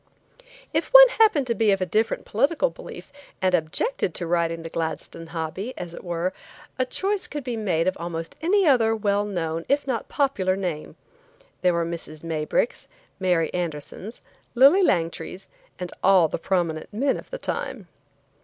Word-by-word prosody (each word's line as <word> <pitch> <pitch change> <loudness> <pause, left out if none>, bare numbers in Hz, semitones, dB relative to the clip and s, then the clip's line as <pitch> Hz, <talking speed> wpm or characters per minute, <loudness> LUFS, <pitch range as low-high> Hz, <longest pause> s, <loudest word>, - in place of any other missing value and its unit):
If - - 0
one - - +11
happened 420 -12 +5
to 235 - 0
be 225 -2 +2
of 195 -1 +3
a 185 - 0
different 215 +5 0
political 295 - +1
belief - - -11 0.3
and 185 -1 +1
objected 180 - 0
to 175 - -2
riding 165 -1 0
the 165 - -6
Gladstone 165 0 -4
hobby, 165 +8 -5
as 175 -1 -6
it - - -9
were, 175 +1 -2 0.5
a 255 - +1
choice 390 +8 -1
could 295 -1 -5
be 245 -2 -3
made 185 -7 0
of 185 - +1
almost 165 -1 -5
any 390 +5 +3 0.3
well 205 -1 0
known, 165 -5 -3
if 285 0 +2
not 255 -4 -3
popular 235 - +1
name. 175 -6 -4 0.7
There 180 -1 +3
were 170 0 0
Mrs. 165 -2 -7
Maybricks, 160 +7 -1 0.3
Mary 180 -3 +1
Andersons, 175 +5 -5 0.3
Lillie 275 +10 +7
Langtrys, 180 - -1 0.3
and 180 -1 -5
all 185 -3 +6
the - - -4
prominent 170 -4 -1
men 265 +6 +1
of - - -9
the - - -5
time. 265 - -4
185 Hz, 165 wpm, -24 LUFS, 165-255 Hz, 0.7 s, one